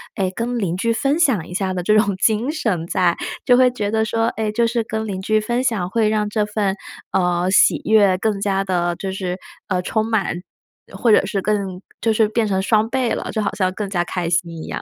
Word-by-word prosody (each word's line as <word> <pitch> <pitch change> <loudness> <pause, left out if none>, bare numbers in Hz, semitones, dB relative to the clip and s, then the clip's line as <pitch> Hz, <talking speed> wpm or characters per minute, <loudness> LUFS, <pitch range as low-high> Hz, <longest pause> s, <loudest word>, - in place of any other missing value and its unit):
哎， 190 -2 -1
跟 240 +1 -2
邻 185 -6 -1
居 230 +5 0
分 275 +6 0
享 240 - +2
一 180 - -9
下 190 0 -1
的 180 - -2
这 215 +4 +3
种 205 -3 +2
精 220 +6 +1
神 195 - -2
在， 180 -2 +2 0.3
就 245 - +5
会 255 0 +5
觉 210 -5 -3
得 220 0 +1
说， 225 +1 -1
哎， 220 -1 -1
就 235 +2 +1
是 230 0 0
跟 220 0 -4
邻 190 -3 -4
居 215 +3 +2
分 240 +4 -1
享 225 -8 0
会 220 -1 +2
让 215 -1 0
这 210 0 0
份， 210 -2 -1 0.4
呃， 180 -1 +1
喜 190 - +4
悦 205 -4 +4
更 205 0 -1
加 195 -1 0
地 175 -2 0
就 190 +2 -4
是， 185 -1 -3 0.3
呃， 185 -3 0
充 220 +4 0
满， 195 -5 -1 0.5
或 235 - +2
者 210 - +5
是 200 - -1
更 195 -3 -2 0.2
就 225 - +2
是 220 0 +3
变 220 +1 0
成 190 -2 0
双 215 +2 +2
倍 255 -2 0
了， - - -4
就 220 - -1
好 - - -1
像 185 -2 +1
更 200 0 -4
加 175 -3 0
开 175 -1 -3
心 170 0 0
一 - - -9
样。 - - -5
210 Hz, 250 characters per minute, -20 LUFS, 185-225 Hz, 0.5 s, 就